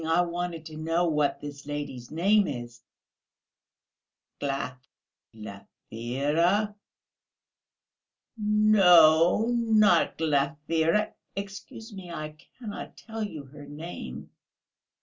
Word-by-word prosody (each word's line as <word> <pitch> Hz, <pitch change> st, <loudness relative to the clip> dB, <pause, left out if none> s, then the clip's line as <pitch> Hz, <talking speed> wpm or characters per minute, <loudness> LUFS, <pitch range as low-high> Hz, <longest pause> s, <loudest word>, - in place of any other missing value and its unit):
I 165 Hz, +2 st, +3 dB
wanted 175 Hz, -1 st, -3 dB
to 155 Hz, -1 st, -9 dB
know 165 Hz, +2 st, 0 dB
what 150 Hz, -4 st, 0 dB
this 145 Hz, -1 st, -9 dB
lady's 140 Hz, -4 st, -5 dB
name 195 Hz, +6 st, +3 dB
is." 120 Hz, -3 st, -6 dB, 1.6 s
"Glaf...." 135 Hz, -2 st, -3 dB, 0.5 s
"Glafira?" 135 Hz, -, -2 dB, 1.6 s
"No, 195 Hz, -5 st, +5 dB
not 215 Hz, -6 st, +3 dB
Glafira.... 160 Hz, +5 st, +1 dB, 0.2 s
Excuse 200 Hz, +3 st, -8 dB
me, 190 Hz, -3 st, -9 dB
I 155 Hz, -2 st, -6 dB, 0.2 s
cannot 220 Hz, -5 st, -8 dB
tell 225 Hz, -1 st, -7 dB
you 160 Hz, -8 st, -6 dB
her 145 Hz, +1 st, -13 dB
name." 145 Hz, -, -8 dB
160 Hz, 90 wpm, -27 LUFS, 140-195 Hz, 1.6 s, No